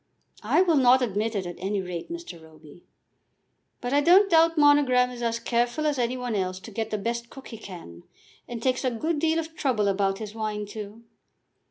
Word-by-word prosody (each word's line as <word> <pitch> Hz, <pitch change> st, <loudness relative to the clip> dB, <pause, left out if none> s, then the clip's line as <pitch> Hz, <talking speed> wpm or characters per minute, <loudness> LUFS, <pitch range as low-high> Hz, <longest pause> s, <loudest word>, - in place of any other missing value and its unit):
"I 365 Hz, -, +3 dB
will 335 Hz, -5 st, +2 dB
not 255 Hz, 0 st, +5 dB
admit 220 Hz, 0 st, -1 dB
it, 195 Hz, -2 st, -2 dB
at 175 Hz, -1 st, -7 dB
any 195 Hz, +2 st, -2 dB
rate, 180 Hz, -, -6 dB
Mr. 335 Hz, -, -8 dB
Roby." 160 Hz, +1 st, -17 dB, 1.0 s
"But 245 Hz, +2 st, -3 dB
I 290 Hz, -, +4 dB
don't 375 Hz, +5 st, +5 dB
doubt 330 Hz, 0 st, +4 dB
Monogram 280 Hz, -4 st, +4 dB
is 245 Hz, -1 st, -8 dB
as 230 Hz, -1 st, 0 dB
careful 240 Hz, +5 st, -1 dB
as 295 Hz, -3 st, 0 dB
any 245 Hz, +1 st, 0 dB
one 250 Hz, -2 st, -3 dB
else 185 Hz, -2 st, -2 dB
to 225 Hz, -, -10 dB
get 220 Hz, +1 st, -3 dB
the 215 Hz, -, -2 dB
best 235 Hz, +3 st, -3 dB
cook 270 Hz, -, -12 dB
he 225 Hz, -, -9 dB
can, 170 Hz, -, -10 dB, 0.5 s
and 235 Hz, -1 st, -7 dB
takes 255 Hz, 0 st, 0 dB
a 255 Hz, -, +2 dB
good 300 Hz, +7 st, -2 dB
deal 320 Hz, +1 st, +1 dB
of 325 Hz, 0 st, -4 dB
trouble 235 Hz, -9 st, 0 dB
about 195 Hz, 0 st, +1 dB
his 215 Hz, -1 st, -7 dB
wine 215 Hz, -1 st, -3 dB
too. 210 Hz, +2 st, -9 dB
235 Hz, 205 wpm, -26 LUFS, 205-280 Hz, 1.0 s, not